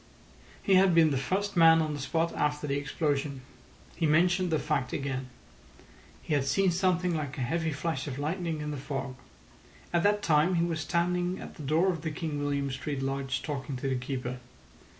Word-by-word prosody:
He 195 - +3
had 185 -2 +5
been 160 -2 +6
the - - +1
first 195 +9 -1
man 165 -1 +7
on 155 -1 0
the 145 - -5
spot 165 +5 -1
after 150 0 0
the 140 -1 -1
explosion. 140 -1 -1 0.5
He 165 - +1
mentioned 175 +4 +3
the 160 - +2
fact 150 -4 -1
again. 135 -2 -3 0.9
He - - -2
had 145 -2 +2
seen 185 +7 +2
something 180 0 +1
like 145 -3 -4
a - - -3
heavy 160 +6 0
flash 145 -1 -3
of 135 -2 -4
lightning 160 +1 -2
in 150 0 -3
the 145 - -4
fog. 135 -1 -4 0.8
At 170 - +3
that 205 +2 +2
time 160 +3 +3
he 170 0 +2
was 165 -2 -2
standing 180 +3 0
at - - -9
the - - -11
door 160 +7 +2
of 165 -4 -5
the 160 - -2
King 150 -1 -4
William 140 -1 -1
Street 135 +1 -4
Lodge 135 -1 -2
talking 140 -2 -4
to 130 +2 -3
the 135 - 0
keeper. 125 -1 -4
150 Hz, 195 wpm, -29 LUFS, 140-170 Hz, 0.9 s, man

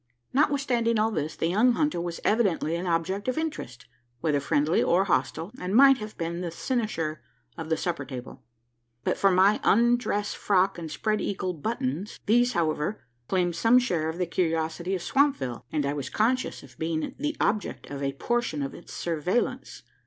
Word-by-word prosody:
Notwithstanding 260 -5 +2
all 220 +1 +2
this, 155 -5 -2
the - - -1
young 215 +9 +4
hunter 295 - 0
was 170 -1 -4
evidently 195 -7 +1
an 175 +2 -3
object 175 +5 -1
of 255 - 0
interest 295 - -4 0.3
whether 150 +1 +1
friendly 145 +3 +2
or 180 +3 +3
hostile 160 +1 -1
and 185 +3 -2
might 270 +1 +7
have 215 0 -8
been 170 +1 -3
the 175 - -3
cynosure 170 - -2 0.3
of 160 -1 -6
the 160 - +1
supper 170 -5 -2
table, 130 -1 -8 0.6
but - - +1
for 195 - +3
my 190 +3 +4
undress 235 -2 +2
frock 195 -2 +1
and 165 -2 -6
spread 215 +8 -1
eagle 185 -2 -2
buttons. 225 - -3
These, 245 +3 +3
however, 160 +3 -1 0.2
claimed 175 -2 +1
some 230 +6 +5
share 175 -11 +1
of 160 - -5
the 180 - 0
curiosity 165 +1 -1
of 180 - -4
Swampville; 270 - +1
and 150 -2 0
I 140 - 0
was 140 -3 -4
conscious 250 +4 0
of 120 -3 -16
being 160 -1 -2
the 295 +1 -2
object 210 0 -1
of 140 -1 -5
a 140 0 -1
portion 200 - -1
of 135 - -4
its - - -12
surveillance. 175 +7 -2
180 Hz, 175 wpm, -27 LUFS, 160-230 Hz, 0.6 s, might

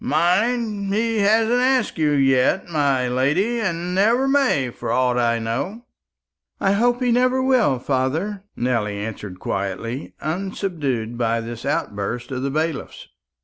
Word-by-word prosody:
Mind, 210 0 +1
he 225 +2 0
hasn't 225 +4 +3
asked 255 -7 +1
you 150 -2 +2
yet, 135 +6 +2
my 140 -6 +1
lady; 150 - +1
and 175 -3 -2
never 230 +8 +3
may, 265 - +2
for 115 - -5
aught 125 0 +2
I 115 -1 +2
know." 130 - -4 0.7
"I 195 - +2
hope 240 +5 +2
he 245 - +2
never 255 +2 +3
will, 260 - +3
father," 145 +11 -1
Nelly 115 -4 -1
answered 100 -3 -6
quietly, 95 +1 -4
unsubdued 155 - -3
by 115 -1 +1
this 115 +2 -6
outburst 120 -5 -2
of 130 -1 -3
the 140 - -1
bailiff's. 155 +1 -3
155 Hz, 140 wpm, -22 LUFS, -, 0.7 s, hasn't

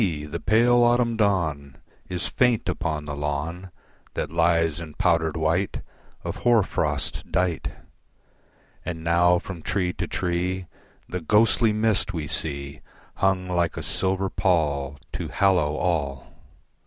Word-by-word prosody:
the 75 - -5
pale 120 +4 +4
autumn 120 -1 +3
dawn 80 -10 0 0.3
Is 90 -1 -2
faint, 125 -3 +2
upon 80 -4 -2
the 75 -1 -4
lawn 75 +6 -3 0.5
That - - -2
lies 85 -1 +2
in 80 -3 -8
powdered 85 -4 +1
white 80 +5 0 0.4
Of - - -4
hoar 120 -3 +4
frost 75 -6 -2
dight 90 -3 0 1.2
And 80 -2 -5
now 85 +1 +4
from 90 -1 -7
tree 90 +1 -1
to - - -3
tree 90 +1 -1 0.4
The 90 0 -4
ghostly 110 +5 +3
mist 105 -3 +1
we 80 -3 -3
see 70 -1 -5 0.4
Hung 95 -1 +1
like 85 -2 0
a - - -4
silver 95 0 0
pall 70 -6 0 0.2
To - - -3
hallow 90 -7 +2
all. 70 -6 -2
85 Hz, 130 wpm, -25 LUFS, 80-95 Hz, 1.2 s, pale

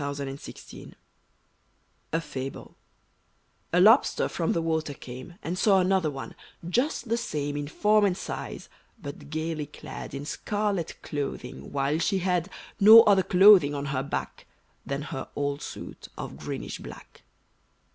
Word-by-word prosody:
=The 140 0 -3
Envious 135 +1 -7 0.3
Lobster= - - -11 1.2
A 165 - +1
FABLE 135 -3 -7 1.0
A 180 - +3
Lobster 220 +8 +5
from 165 -2 -1
the 165 - 0
water 160 -3 -1
came, 130 +8 -10
And 180 +3 -3
saw 195 -3 +5
another, 180 -7 0 0.3
just 245 - 0
the 230 - +2
same 145 -9 -3
In 145 0 -3
form 210 +6 +3
and 185 -2 +1
size; - - -6 0.3
but 145 -4 -9
gayly 155 -1 -3
clad 150 - -9
In 140 +1 -5
scarlet 205 0 -2
clothing; 140 - -5
while 140 +2 0
she 195 +3 +1
had 180 -1 0 0.3
No 220 +3 +10
other 200 -3 +5
clothing 185 -6 +6
on 140 0 -3
her 130 - 0
back 140 - -5 0.4
Than 140 +1 -2
her 135 -2 -6
old 145 0 -2
suit - - -8
of - - -6
greenish - - -6
black. - - -12
160 Hz, 145 wpm, -27 LUFS, 145-195 Hz, 1.2 s, No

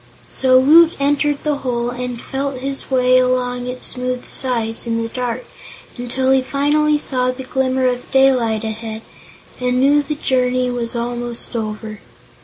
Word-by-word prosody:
So 255 -1 +3
Woot 320 +5 +6
entered 290 +1 +1
the 300 -2 0
hole 245 -3 -2
and 250 -1 -5
felt 275 +1 -4
his 275 +1 -3
way 255 -1 +4
along 250 -1 0
its 250 0 -4
smooth 250 0 -2
sides 230 -3 0
in 230 0 -1
the 230 - -4
dark 250 - -4 0.5
until 260 +2 0
he 265 0 +4
finally 295 +3 +1
saw 255 -3 0
the 255 +1 -4
glimmer 260 0 0
of 250 -1 -1
daylight 255 -5 +3
ahead 220 0 -5 0.6
and 250 0 0
knew 285 +3 +4
the 300 +1 -4
journey 255 -2 0
was 240 -1 -3
almost 240 0 -4
over. 215 -1 -5
255 Hz, 155 wpm, -18 LUFS, 240-270 Hz, 0.6 s, Woot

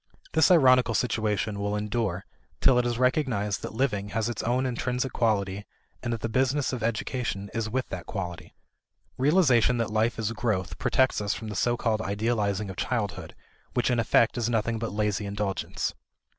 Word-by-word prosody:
This 160 -1 +5
ironical 130 -8 +5
situation 105 -3 0
will 100 +1 -1
endure 105 -3 -2 0.3
till 130 -2 +5
it 120 - +1
is 120 -1 -1
recognized 125 -6 +1
that - - -6
living 105 -6 0
has 110 +2 -1
its 120 - -3
own 125 +3 0
intrinsic 125 +1 -2
quality 100 -3 0 0.4
and 120 - -3
that 115 -2 -3
the - - -1
business 130 +4 +1
of 125 - -3
education 110 -2 -2
is 115 -1 -2
with 130 +3 -1
that 90 - -6
quality. 90 -4 -6 0.6
Realization 130 - +4
that 115 -2 -1
life 110 +2 +1
is 110 -1 -1
growth 110 -5 -2
protects 130 -4 +2
us 100 - -1
from 110 - -6
that 105 - -5
so 120 +4 +1
called 110 -2 0
idealizing 105 -1 -1
of 95 - -11
childhood 100 -8 -3 0.4
which 125 0 +2
in 120 - +2
effect 115 +1 +3
is 120 0 0
nothing 115 0 0
but 115 - -3
lazy 105 -1 -1
indulgence. 100 -1 -2
115 Hz, 175 wpm, -27 LUFS, 105-125 Hz, 0.6 s, This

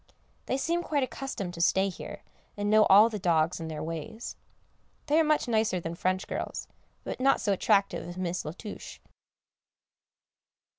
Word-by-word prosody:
They 260 - 0
seem 335 +5 0
quite 290 -5 0
accustomed 250 -9 -4
to 170 - -5
stay 190 +3 +3
here, 190 - -7 0.3
and 205 0 0
know 215 0 +6
all 205 +3 +8
the 215 -2 -4
dogs 170 -2 +2
and 160 -1 -5
their 155 -1 -4
ways. 165 +8 -6 0.7
They 305 +1 +3
are - - +5
much 305 -3 +2
nicer 220 -5 +1
than 165 -1 -5
French 185 +2 -1
girls, - - -4 0.4
but - - -5
not 275 +1 +4
so 205 - +1
attractive 195 -1 +1
as 175 - -8
Miss 180 -1 -2
La 155 - -5
Touche. 210 +3 -9
195 Hz, 165 wpm, -29 LUFS, 175-240 Hz, 0.7 s, all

